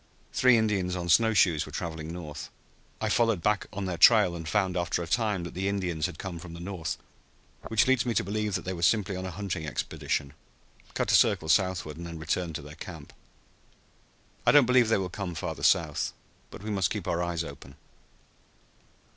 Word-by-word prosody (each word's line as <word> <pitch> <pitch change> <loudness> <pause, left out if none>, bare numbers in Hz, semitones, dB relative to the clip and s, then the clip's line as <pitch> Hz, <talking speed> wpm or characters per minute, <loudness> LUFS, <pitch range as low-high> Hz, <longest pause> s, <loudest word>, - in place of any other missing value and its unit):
Three 125 -2 +5
Indians 100 -5 0
on 85 -1 -4
snow 110 +5 +4
shoes 85 -6 +3
were - - -10
traveling 80 -2 -5
north. 75 -4 -7 0.5
I 110 - -1
followed 115 -5 +2
back 105 -1 +1
on 100 -1 -4
their 90 -2 -3
trail 105 -4 +6
and 80 -1 -6
found 95 -3 +1
after 85 -1 -1
a - - -7
time 105 -1 0
that 85 - -7
the 95 +2 -2
Indians 90 -6 -1
had - - -9
come 90 -3 -6
from 85 0 -9
the - - -9
north, 85 -4 -4 0.7
which 110 -1 +3
leads 130 -1 +3
me 120 -2 -2
to - - +2
believe 105 +1 -2
that - - -3
they 95 - -2
were 85 - -6
simply 100 +2 +2
on 95 0 -4
a - - -4
hunting 95 -4 -4
expedition, 70 -1 -3 0.6
cut - - 0
a - - +6
circle 80 - +3
southward, 90 -4 +1
and 85 0 -7
then 85 -1 -7
returned 80 +1 -2
to 75 - -5
their 75 +1 -10
camp. - - -10 1.3
I - - +5
don't 145 -3 +7
believe 125 -2 +4
they 115 - +4
will 95 -1 -2
come 90 -2 -5
farther 80 - -4
south. - - +2 0.4
But - - -11
we 110 - -4
must 95 -3 +1
keep 105 -5 -4
our 85 0 0
eyes 85 -1 -1
open." 70 -2 -10
90 Hz, 205 wpm, -28 LUFS, 85-105 Hz, 1.3 s, don't